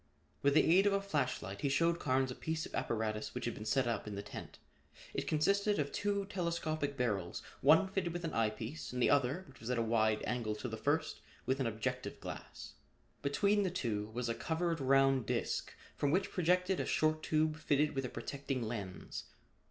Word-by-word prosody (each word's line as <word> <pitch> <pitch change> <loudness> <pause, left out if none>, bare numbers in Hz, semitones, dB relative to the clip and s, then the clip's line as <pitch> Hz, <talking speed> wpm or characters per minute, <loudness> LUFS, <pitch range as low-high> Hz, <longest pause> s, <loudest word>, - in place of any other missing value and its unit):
With 140 0 +3
the - - +6
aid 190 +5 +5
of 200 - +3
a 200 - +3
flash 150 -10 -1
light 100 -1 -6
he 140 - +1
showed 165 +4 +2
Carnes 130 -1 +1
a - - -5
piece 160 0 -2
of - - -11
apparatus 110 -1 -2
which 125 - -3
had 120 - -1
been 105 - -8
set 130 +3 +2
up 115 -3 -2
in 105 - -4
the 100 - -4
tent. 105 - -8 0.6
It - - -2
consisted 200 +7 +2
of 145 -1 -1
two 200 -1 0
telescopic 170 -7 -2
barrels, 100 -8 -1 0.2
one 160 +7 +6
fitted 190 -2 -1
with 175 +1 -4
an 165 - -2
eye 115 -1 +3
piece 110 +7 -6
and 125 - -3
the 120 - +4
other, 145 +6 +2
which 135 - -16
was 115 - -6
at 125 - +1
a - - +2
wide 110 -1 +2
angle 115 -3 -1
to 115 - -5
the 110 - -4
first, 145 +8 0 0.2
with 130 +2 +1
an 130 - +1
objective 110 -1 -3
glass. - - -8 0.5
Between 200 +9 +2
the 190 - +1
two 115 - -2
was 120 +2 -3
a 115 - 0
covered 165 +4 -1
round 135 -2 +4
disc - - -1 0.2
from 145 - +1
which 185 +6 +1
projected 180 +1 +2
a - - 0
short 155 0 +2
tube 155 0 +1
fitted 150 0 +1
with 135 -1 -1
a 125 - -3
protecting 135 +1 -3
lens. 105 -5 -5
140 Hz, 210 wpm, -35 LUFS, 115-165 Hz, 0.6 s, the